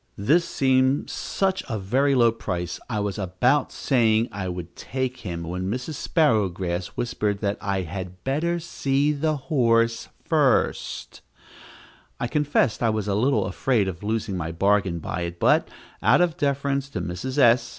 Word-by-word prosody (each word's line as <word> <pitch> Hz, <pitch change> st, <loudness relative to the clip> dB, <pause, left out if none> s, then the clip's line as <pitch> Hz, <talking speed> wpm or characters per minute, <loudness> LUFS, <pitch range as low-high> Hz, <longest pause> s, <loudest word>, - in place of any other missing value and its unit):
This 155 Hz, -, +3 dB
seemed 130 Hz, +1 st, +2 dB
such 190 Hz, -1 st, -1 dB
a 110 Hz, -, -1 dB
very 130 Hz, +8 st, +1 dB
low 120 Hz, -2 st, +5 dB
price, 90 Hz, -6 st, -4 dB
I 110 Hz, -3 st, -1 dB
was 105 Hz, 0 st, -2 dB
about 105 Hz, +10 st, +1 dB
saying 115 Hz, -3 st, +2 dB
I 95 Hz, -2 st, -4 dB
would 85 Hz, -1 st, -7 dB
take 130 Hz, 0 st, -3 dB
him, 85 Hz, -5 st, -5 dB
when 90 Hz, +3 st, -3 dB
Mrs. 125 Hz, +8 st, -3 dB
Sparrowgrass 95 Hz, -, 0 dB
whispered 105 Hz, -4 st, -1 dB
that 100 Hz, -1 st, -1 dB
I 100 Hz, -2 st, -1 dB
had 90 Hz, +1 st, -7 dB
better 160 Hz, +6 st, 0 dB
see 145 Hz, -3 st, 0 dB
the 155 Hz, +1 st, 0 dB
horse 115 Hz, -4 st, +1 dB, 0.2 s
first. -, -, 0 dB, 1.0 s
I -, -, -1 dB
confess 145 Hz, -3 st, +1 dB
I 115 Hz, -, +3 dB
was 110 Hz, -2 st, -1 dB
a 100 Hz, -, 0 dB
little 110 Hz, 0 st, +2 dB
afraid 100 Hz, +2 st, +1 dB
of 85 Hz, -3 st, -5 dB
losing 110 Hz, -1 st, -2 dB
my 85 Hz, -2 st, -3 dB
bargain 95 Hz, 0 st, +1 dB
by 85 Hz, +2 st, -4 dB
it, 85 Hz, 0 st, -5 dB
but, -, -, +3 dB, 0.3 s
out -, -, +5 dB
of 175 Hz, -3 st, +2 dB
deference 140 Hz, -1 st, -1 dB
to -, -, -4 dB
Mrs. 130 Hz, +11 st, -4 dB
S. 120 Hz, -2 st, +5 dB
115 Hz, 160 wpm, -24 LUFS, 95-135 Hz, 1.0 s, low